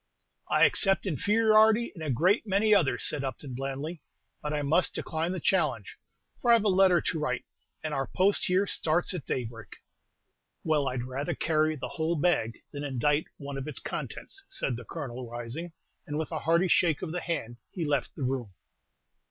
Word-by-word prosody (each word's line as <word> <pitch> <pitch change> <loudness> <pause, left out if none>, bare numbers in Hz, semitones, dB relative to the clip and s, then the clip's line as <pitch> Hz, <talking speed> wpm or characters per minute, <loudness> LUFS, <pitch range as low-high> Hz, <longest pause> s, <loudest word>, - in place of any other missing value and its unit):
"I - - +5
accept 195 0 +2
inferiority 215 +5 +4
in 165 - -9
a 155 - -3
great 180 - +2
many 205 +2 +3
others," 145 - +3
said 150 -2 -2
Upton, 135 0 -5
blandly; 140 +5 -4 0.4
"but 150 - -3
I 150 -1 -1
must 160 +6 +2
decline 165 +2 -2
the 185 - -3
challenge, - - 0 0.4
for 240 - 0
I - - +9
have 225 - +2
a 210 - +3
letter 185 -2 +5
to 160 - -1
write, 125 -5 -2 0.4
and 155 -1 -3
our 135 -1 -1
post 195 +2 +2
here 185 +2 +3
starts 175 -1 +1
at 175 -6 -6
daybreak." 115 -3 -4 1.0
"Well, 150 -3 +1
I'd 125 -2 -2
rather 130 +3 -3
carry 155 -1 +1
the 140 - -5
whole 160 +1 -1
bag 145 -9 0
than 145 0 -5
indite 145 +2 +1
one 140 -1 -6
of 135 - -6
its 150 - -6
contents," 395 - -6
said 135 - -2
the 120 0 -8
Colonel, 130 -6 -6
rising; 120 +9 -6 0.4
and, 150 0 -3
with 160 +1 -3
a 160 - -2
hearty 170 +3 +2
shake 165 -3 +3
of 160 - -3
the 175 +1 -3
hand, 120 -9 -3
he 170 -4 -4
left 145 -3 -1
the 145 - -4
room. 125 -6 -2
155 Hz, 185 wpm, -29 LUFS, 135-180 Hz, 1.0 s, I